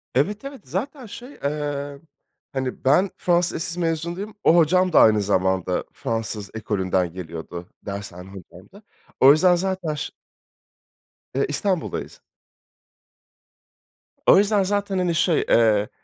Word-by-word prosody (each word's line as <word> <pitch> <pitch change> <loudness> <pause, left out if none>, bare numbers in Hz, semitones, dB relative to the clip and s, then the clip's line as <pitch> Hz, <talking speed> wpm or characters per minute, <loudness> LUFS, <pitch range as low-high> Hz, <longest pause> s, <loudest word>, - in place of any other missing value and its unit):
Evet, 205 - 0
evet. 275 -4 -8
Zaten, 250 - -4
şey, 245 +5 -10
eee, 145 -1 -3 0.5
hani, 130 -2 -4
ben 180 +9 +4
Fransız 175 0 +1
lisesi 170 +2 -4
mezunuyum, 170 +5 -3
o 165 - +5
hocam 180 +2 +3
da - - +7
aynı 110 -1 +5
zamanda 95 -2 0
Fransız 115 -2 -4
ekolünden 95 -5 -1
geliyordu, 85 0 -7 0.2
dershane 95 -2 -7
hocam 95 -1 -13
da. 200 - -14 0.4
O 135 - +8
yüzden 175 +4 +5
zaten 185 -3 -2
ş 145 - -5 1.2
Eee, 140 - +2
İstanbul'dayız. 180 +3 -2 2.1
O - - +8
yüzden 205 0 +3
zaten, 200 0 -1
hani, 180 -2 0
şey, 170 -1 +2
eee, 110 -3 +3
150 Hz, 125 wpm, -23 LUFS, -, 2.1 s, O